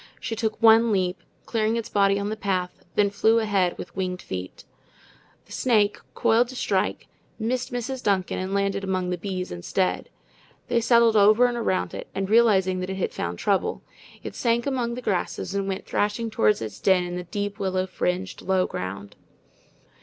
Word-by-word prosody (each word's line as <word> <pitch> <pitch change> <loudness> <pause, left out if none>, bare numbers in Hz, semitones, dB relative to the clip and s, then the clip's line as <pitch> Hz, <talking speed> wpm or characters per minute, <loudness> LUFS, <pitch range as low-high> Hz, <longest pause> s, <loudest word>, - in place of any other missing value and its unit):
She 230 - -4
took 220 -1 -2
one 225 0 +6
leap, 185 -2 0 0.2
clearing 225 -1 0
its 230 -1 -3
body 200 -2 +3
on 200 +1 -2
the 215 - -2
path, 185 -4 -2
then 205 -1 +3
flew 220 +3 +3
ahead 200 -5 +1
with - - -9
winged 185 -1 -3
feet. 95 0 -6 0.8
The - - -21
snake, 215 -5 +2 0.2
coiled 230 +2 +3
to 260 - -10
strike, - - -1 0.3
missed 250 +3 -2
Mrs. 245 +2 -3
Duncan 195 -5 0
and 185 +1 -3
landed 200 0 0
among 185 -2 -1
the 180 - -1
bees 185 -1 -4
instead. 90 +1 -1 0.6
They 235 - +2
settled 235 -1 +4
over 215 +4 +6
and 245 -1 0
around 220 -6 -1
it, - - -6
and 195 0 -1
realizing 195 -5 +4
that 185 +1 -4
it 190 - -4
had 190 - -2
found 85 +1 -3
trouble, 195 - 0 0.4
it - - -6
sank 235 -1 0
among 245 -4 -1
the 250 - -7
grasses 190 -2 -2
and 200 -1 -1
went 190 0 -3
threshing 210 +2 -1
toward 105 - +3
its 110 -2 -7
den 190 -2 +3
in 175 0 -5
the 180 0 -5
deep 205 +3 -4
willow 185 -1 0
fringed 185 0 -3
low 185 -1 +1
ground. 100 +2 -6
200 Hz, 185 wpm, -25 LUFS, 185-225 Hz, 0.8 s, one